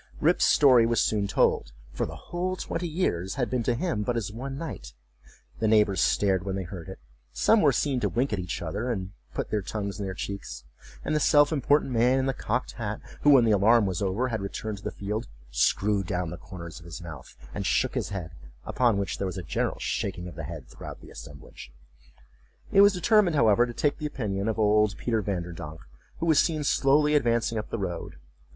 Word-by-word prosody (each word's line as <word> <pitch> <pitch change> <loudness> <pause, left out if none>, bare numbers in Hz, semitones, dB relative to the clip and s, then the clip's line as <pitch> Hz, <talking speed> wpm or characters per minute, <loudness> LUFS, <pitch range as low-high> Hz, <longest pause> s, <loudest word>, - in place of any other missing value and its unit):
Rip's - - +3
story 125 -5 +6
was 115 -1 +1
soon 105 -2 +1
told, 60 -9 +1 0.2
for - - -2
the - - -8
whole 180 +1 -3
twenty 175 -1 -4
years 95 - -1
had 125 -3 -2
been 125 -2 0
to 120 +1 0
him 120 - -1
but 120 +3 -1
as 105 -4 -3
one 135 +5 -6
night. 105 - -7 0.6
The 110 - +1
neighbors 105 -4 +3
stared 95 -3 +2
when 95 -1 -3
they 95 - -3
heard 90 0 -8
it; 95 - -8 0.3
some 220 - +3
were 145 - +5
seen 135 0 0
to - - 0
wink 125 0 0
at 100 - -1
each 90 -1 -4
other, 100 +9 -3
and 95 -4 -4 0.2
put - - -3
their 105 - 0
tongues 100 +2 -4
in 100 - -3
their 95 -1 -4
cheeks: 100 -7 -6 0.4
and - - 0
the - - +3
self 145 0 +5
important 145 -1 +2
man 125 +2 +3
in 130 - +1
the 135 - 0
cocked 125 +1 -2
hat, 110 -2 -4 0.2
who, 145 - +4
when 135 -5 +7
the 110 - +3
alarm 105 +2 +5
was 95 0 -2
over, 100 +6 0
had 110 -3 -2
returned 100 +1 -5
to - - -17
the - - -2
field, 105 +4 -4 0.2
screwed 100 +11 +1
down 90 -3 -2
the - - -5
corners 85 -3 -9
of 85 - -15
his 85 - -8
mouth, 80 -7 -10 0.2
and - - -3
shook - - +1
his - - -2
head—upon 80 - -2
which 100 -1 -3
there 100 - -1
was 90 - -5
a 90 - -5
general 80 - -2
shaking 90 -2 -3
of 90 - -8
the 80 - -7
head 80 -4 -8
throughout - - -10
the - - -13
assemblage.It 65 - -6
was 200 0 +7
determined, 185 -2 +3
however, 120 -2 +4
to 120 - -6
take 145 - 0
the 150 - -2
opinion 105 -7 -3
of 110 - -1
old 105 -1 +3
Peter 115 -3 0
Vanderdonk, 85 -5 -5 0.4
who - - -3
was 160 -3 +4
seen 155 -3 +1
slowly 145 +2 +3
advancing 115 -5 +1
up 105 - -7
the - - -3
road. 90 -5 -4
105 Hz, 215 wpm, -27 LUFS, 95-130 Hz, 0.6 s, when